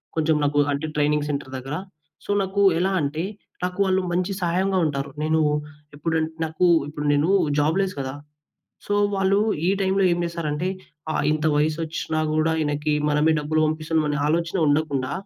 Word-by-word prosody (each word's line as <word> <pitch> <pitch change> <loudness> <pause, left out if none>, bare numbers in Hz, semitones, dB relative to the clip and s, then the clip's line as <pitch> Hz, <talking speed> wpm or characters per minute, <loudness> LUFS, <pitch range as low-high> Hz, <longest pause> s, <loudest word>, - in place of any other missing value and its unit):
కొంచెం 160 0 +2
నాకు 145 0 +2
అంటే 140 +3 -2
ట్రైనింగ్ 150 0 +1
సెంటర్ 140 -2 -5
దగ్గర 135 +3 -5 0.5
సో, - - -2
నాకెలా 190 -2 +2
అంటే 145 +3 -2 0.4
నాకు 180 +2 -3
వాళ్ళు 190 0 +2
మంచి 180 +3 0
సహాయంగా 185 +2 +1
ఉంటారు. 140 -2 -2
నేను 160 +1 +2 0.6
ఎప్పుడంటే 160 +1 -1
నాకు 160 +3 0 0.2
ఇప్పుడు 150 0 -5
నేను 150 +5 +2 0.3
జాబ్ 155 +5 +2
లెస్ 195 -1 0
కదా! 130 0 -3 0.7
సో, 205 - -1 0.2
వాళ్ళు 195 +1 +2 0.3
ఈ - - +4
టైమ్‌లో 195 0 +2
ఏం 175 - 0
చేస్తారంటే 170 0 -2 0.5
ఆహ్, - - 0
ఇంత 155 0 -1
వయసచ్చినా 155 +1 -1
గూడా 155 +1 +2
ఈయనకి 150 +1 -1 0.2
మనమే 150 +2 +3
డబ్బులు 155 +1 0
పంపిస్తున్నాం 155 0 -1
అనే 145 - -1
ఆలోచన 170 +3 0
ఉండకుండా 145 -3 0
155 Hz, 155 wpm, -23 LUFS, 150-180 Hz, 0.7 s, ఈ